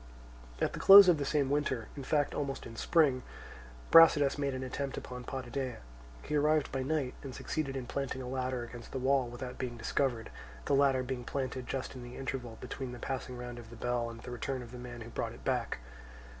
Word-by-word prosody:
At - - 0
the - - -5
close 195 0 +11
of 170 -4 +5
the 140 - -1
same 140 -2 +1
winter, 130 -6 0
in 140 - -6
fact 145 +2 +1
almost 140 -2 -3
in 115 - -9
spring, 140 -1 +3 0.7
Brasidas 150 -4 +8
made 140 -2 0
an 130 - -4
attempt 135 +1 -4
upon 125 -1 -7
Potidæa. 130 -1 -4 0.5
He 150 - -2
arrived 150 0 +2
by 135 - -1
night, 135 -2 -1
and 135 -3 -7
succeeded 140 -4 -3
in 130 - -4
planting 135 +1 -3
a 130 - -5
ladder 130 -1 -2
against 120 0 -10
the - - -2
wall 130 0 +2
without 125 +1 -7
being 125 -2 -4
discovered, 120 0 -1 0.3
the - - +1
ladder 135 -2 +4
being 125 -1 -4
planted 130 -1 -3
just 135 -1 -3
in 130 - -8
the 120 0 -9
interval 125 -4 -4
between 125 0 -6
the - - -7
passing 125 0 -4
round 120 0 -6
of 115 -2 -11
the 120 - -10
bell 120 0 -1
and 115 0 -9
the - - -8
return 130 +1 -3
of 120 - -12
the 125 - -8
man 120 -1 -8
who 115 +1 -9
brought - - -3
it - - -14
back. - - 0
130 Hz, 215 wpm, -32 LUFS, 125-140 Hz, 0.7 s, close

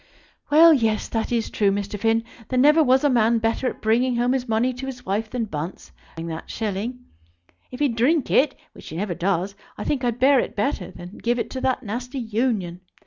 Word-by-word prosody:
Well, 320 +3 +8
yes; 225 -6 +1
that 225 0 -2
is 230 -2 -1
true, 205 -2 +2
Mr. 200 +1 -3
Finn. 225 +1 +2 0.3
There 255 - -1
never 300 +5 +6
was 260 0 +3
a - - +5
man 235 -2 +3
better 225 +3 0
at - - -5
bringing 240 +3 +2
home 240 +1 +1
his 260 -1 -2
money 230 +3 +1
to 260 +2 -7
his 255 -2 -8
wife 210 +3 -1
than 240 -1 -2
Bunce, 165 -2 -6 0.2
barring 165 0 -6
that 160 0 -7
shilling. 225 +4 -4 0.6
If 250 - -8
he'd 275 -6 +2
drink 270 +5 +2
it, 275 +1 +3 0.2
which - - -12
he 160 - -6
never 195 0 -2
does, 185 +2 -1 0.2
I 210 - -4
think 275 -3 -1
I'd 240 -1 0
bear 270 +1 +5
it 235 - -3
better 205 -3 -1
than 175 +3 -11
give 240 +1 0
it - - -3
to 260 - -4
that 260 0 0
nasty 245 +5 -5
Union. 220 -7 -1
235 Hz, 215 wpm, -23 LUFS, 205-255 Hz, 0.6 s, Well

